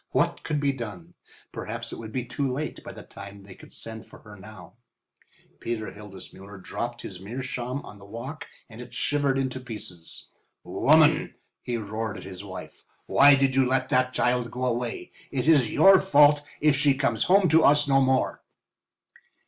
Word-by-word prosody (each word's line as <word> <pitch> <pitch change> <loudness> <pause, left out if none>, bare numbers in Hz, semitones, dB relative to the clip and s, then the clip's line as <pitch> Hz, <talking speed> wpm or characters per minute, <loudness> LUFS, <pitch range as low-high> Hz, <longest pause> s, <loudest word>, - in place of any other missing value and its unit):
What - - +1
could 150 - -2
be 140 -1 +1
done? 105 -9 -8 0.4
Perhaps - - -6
it - - -7
would 110 -1 -8
be 125 +1 -3
too 130 +2 -2
late 150 +4 -5
by - - -8
the - - -11
time 100 0 -12
they 100 -1 -12
could - - -16
send 110 -1 -9
for - - -16
her 105 -1 -13
now. 105 -2 -13 0.9
Peter 115 -2 -4
Hildesmuller 100 -1 -12
dropped 120 +5 -5
his 90 - -8
meerschaum 125 +5 -5
on 105 - -12
the 100 - -14
walk 120 +9 -8 0.2
and 110 +1 -11
it 125 0 -11
shivered 140 0 0
into 130 -1 -2
pieces. 105 -9 -8 0.3
"Woman!" - - +3 0.3
he 120 -1 -3
roared 110 0 -4
at 95 - -9
his 95 0 -9
wife, 95 -2 -10 0.2
"why 140 0 +6
did 135 -1 +1
you 135 - +4
let 130 0 0
that 130 0 +2
child 125 -1 0
go 125 +3 -4
away? 120 -1 -3 0.2
It 130 -1 -2
is 145 -8 +4
your 195 -1 +7
fault 145 -4 +5 0.2
if 150 -1 +3
she 140 0 +3
comes 140 0 0
home 195 0 +4
to 160 +1 +5
us 145 0 +4
no 135 -1 +4
more." 130 -1 +1
125 Hz, 180 wpm, -26 LUFS, 105-135 Hz, 0.9 s, your